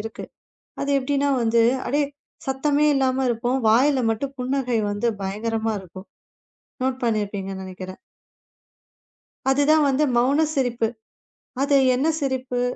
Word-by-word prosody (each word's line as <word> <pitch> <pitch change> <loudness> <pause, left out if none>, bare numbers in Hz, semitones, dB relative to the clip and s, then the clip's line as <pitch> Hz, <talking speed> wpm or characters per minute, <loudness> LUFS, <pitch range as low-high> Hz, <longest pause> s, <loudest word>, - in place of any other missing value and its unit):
இருக்கு. 225 +1 -7 0.6
அது 280 - -1
எப்டின்னா 280 +2 0
வந்து, 230 0 +3 0.2
அடே 290 +3 +1 0.4
சத்தமே 285 +2 +1
இல்லாம 265 -1 +1
இருப்போம். 240 +3 0
வாயில 260 +5 +4
மட்டும் 265 +5 -3
புன்னகை 250 -2 0
வந்து 205 +3 -2 0.2
பயங்கரமா 220 +3 -2
இருக்கும்.நோட் 190 +2 -14 0.8
பண்ணி 220 -3 +1
இருப்பீங்கன்னு 195 -1 -6
நெனைக்கிறன். 185 0 -8 1.5
அதுதான் 290 +3 +4
வந்து 275 +3 +2
மௌன 275 +6 +3
சிரிப்பு. 245 -4 0 0.8
அது 285 +1 +2 0.2
என்ன 265 +4 0
சிரிப்பு? 260 -3 -2
250 Hz, 115 wpm, -23 LUFS, 220-275 Hz, 1.5 s, வாயில